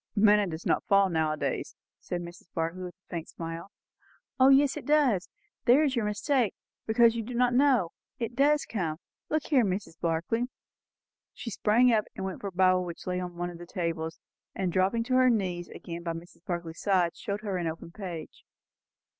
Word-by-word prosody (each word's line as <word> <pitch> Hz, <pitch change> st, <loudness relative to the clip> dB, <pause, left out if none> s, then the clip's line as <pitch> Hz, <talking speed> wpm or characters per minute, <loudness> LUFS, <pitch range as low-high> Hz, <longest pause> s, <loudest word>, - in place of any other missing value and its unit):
"Manna 210 Hz, -1 st, +5 dB
does 160 Hz, 0 st, -6 dB
not -, -, +2 dB
fall 195 Hz, -1 st, +5 dB
now 160 Hz, -2 st, +1 dB
a 155 Hz, -, -2 dB
days," -, -, -3 dB, 0.2 s
said 175 Hz, -, -4 dB
Mrs. 175 Hz, 0 st, -10 dB
Barclay 165 Hz, +3 st, -2 dB
with 180 Hz, -1 st, -6 dB
a 190 Hz, -, -64 dB
faint 170 Hz, -2 st, -4 dB
smile. 165 Hz, +2 st, -6 dB, 0.7 s
"O 260 Hz, +1 st, +7 dB
yes, 275 Hz, 0 st, +5 dB
it -, -, -7 dB
does! 275 Hz, -11 st, +3 dB, 0.4 s
There 265 Hz, +5 st, +6 dB
is 275 Hz, -3 st, +1 dB
your 235 Hz, -3 st, 0 dB
mistake, 220 Hz, +2 st, +1 dB, 0.3 s
because 230 Hz, +1 st, +5 dB
you 230 Hz, -, -1 dB
do 240 Hz, +2 st, -6 dB
not 245 Hz, 0 st, +3 dB
know. 250 Hz, -9 st, +4 dB, 0.3 s
It 235 Hz, -2 st, -4 dB
does 290 Hz, +3 st, +3 dB
come. 170 Hz, -8 st, -2 dB, 0.3 s
Look 310 Hz, -1 st, +1 dB
here, 270 Hz, -6 st, +4 dB
Mrs. 185 Hz, -4 st, -3 dB
Barclay 170 Hz, +8 st, 0 dB, 0.5 s
" -, -, -65 dB
She 230 Hz, -, -6 dB
sprang 235 Hz, +5 st, +4 dB
up, 215 Hz, -2 st, +2 dB
went 190 Hz, -1 st, -4 dB
for 200 Hz, -, -3 dB
a -, -, -4 dB
Bible 185 Hz, 0 st, +3 dB
which 170 Hz, -2 st, -7 dB
lay 180 Hz, 0 st, -1 dB
on 180 Hz, -1 st, -6 dB
one 175 Hz, 0 st, -2 dB
of 170 Hz, -, -11 dB
the 175 Hz, -, -9 dB
tables, 165 Hz, -2 st, -3 dB, 0.4 s
and, 185 Hz, -3 st, -1 dB
dropping 195 Hz, +5 st, +2 dB
on 255 Hz, -, +5 dB
her 255 Hz, 0 st, +6 dB
knees 185 Hz, -6 st, 0 dB
again 170 Hz, 0 st, -7 dB
by 170 Hz, -1 st, -3 dB
Mrs. 170 Hz, +1 st, -11 dB
Barclay's 170 Hz, -2 st, -4 dB
side, 185 Hz, -4 st, +2 dB
showed 200 Hz, 0 st, -4 dB
her 200 Hz, -3 st, -2 dB
an 175 Hz, -2 st, -1 dB
open 165 Hz, +1 st, -6 dB
page. 175 Hz, -4 st, -7 dB
190 Hz, 200 wpm, -29 LUFS, 170-235 Hz, 0.7 s, O